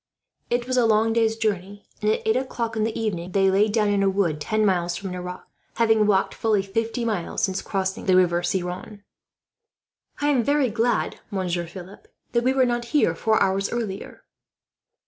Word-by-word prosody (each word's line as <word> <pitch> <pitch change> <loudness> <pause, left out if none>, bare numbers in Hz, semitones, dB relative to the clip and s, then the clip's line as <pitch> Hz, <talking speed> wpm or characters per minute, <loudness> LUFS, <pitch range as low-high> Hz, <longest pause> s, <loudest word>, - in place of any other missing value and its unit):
It 240 0 0
was 255 0 -1
a 240 -2 +4
long 220 +1 +3
day's 225 -1 +2
journey, 205 -2 -3 0.2
and 210 - +1
at 220 - 0
eight 220 - +3
o'clock 240 -3 -2
in 215 - 0
the 225 0 -3
evening 185 -5 -3
they 195 -1 +3
lay 200 +3 +4
down 210 -1 +1
in 200 -1 +2
a 195 - +3
wood, 180 -6 0
ten 215 +7 +1
miles 175 -3 +1
from 190 +1 -6
Nerac; 180 0 -6 0.3
having 225 -2 +3
walked 195 -2 +2
fully 215 -3 +1
fifty 225 +4 -2
miles 205 -7 -2
since 190 0 0
crossing 190 -1 -3
the 185 - +5
river 175 -1 +3
Ciron. 180 +3 -4 1.2
"I 290 - +1
am 270 -4 +3
very 285 -1 +2
glad, 235 +2 0
Monsieur 180 -4 -2
Philip, 185 +3 -11 0.2
that 235 0 +1
we 255 - +3
were 265 -1 +3
not 240 -1 -1
here 295 - +4
four 220 0 +1
hours 195 +1 0
earlier." 215 -5 -5
210 Hz, 185 wpm, -24 LUFS, 190-230 Hz, 1.2 s, the